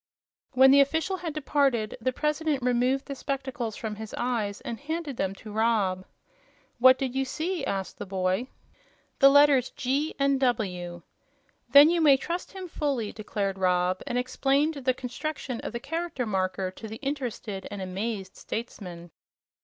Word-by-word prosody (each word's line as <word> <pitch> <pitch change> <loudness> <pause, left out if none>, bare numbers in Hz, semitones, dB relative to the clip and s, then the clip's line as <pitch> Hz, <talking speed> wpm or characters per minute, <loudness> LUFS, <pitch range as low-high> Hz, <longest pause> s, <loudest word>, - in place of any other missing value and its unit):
When 265 +1 +7
the 280 +1 +8
official 320 +7 0
had 340 -3 -4
departed, 275 -7 +1
the 255 - +1
President 300 0 -1
removed 250 +2 +1
the 280 - -5
spectacles 265 -4 -4
from 215 -2 -5
his 220 0 -7
eyes 225 -5 -1
and 230 - -5
handed 315 -1 -4
them 195 -3 -2
to 215 +1 -11
Rob. 205 -4 +1 0.7
"What 260 +1 +7
did 260 -2 -2
you 270 0 +1
see?" 315 +5 -3
asked 195 -1 -3
the 205 - -6
boy. 190 +5 0 0.7
"The 275 - +8
letters 285 -3 +5
'G' 275 +5 -1
and 275 -1 +2
'W'." 180 -9 -1 0.7
"Then 285 +5 +8
you 345 -1 +2
may 285 -4 +6
trust 345 +6 -4
him 380 -1 -7
fully," 275 -9 -2
declared 200 -2 -3
Rob, 180 0 +1
and 245 - -1
explained 275 +4 +1
the 260 -3 0
construction 260 0 -5
of - - -5
the 235 - -4
Character 325 -1 -3
Marker 185 -2 -1
to 220 +4 -9
the 220 - -7
interested 240 -8 -4
and 205 - -6
amazed 190 +1 -4
statesman. 180 -7 -7
250 Hz, 160 wpm, -27 LUFS, 205-280 Hz, 0.7 s, the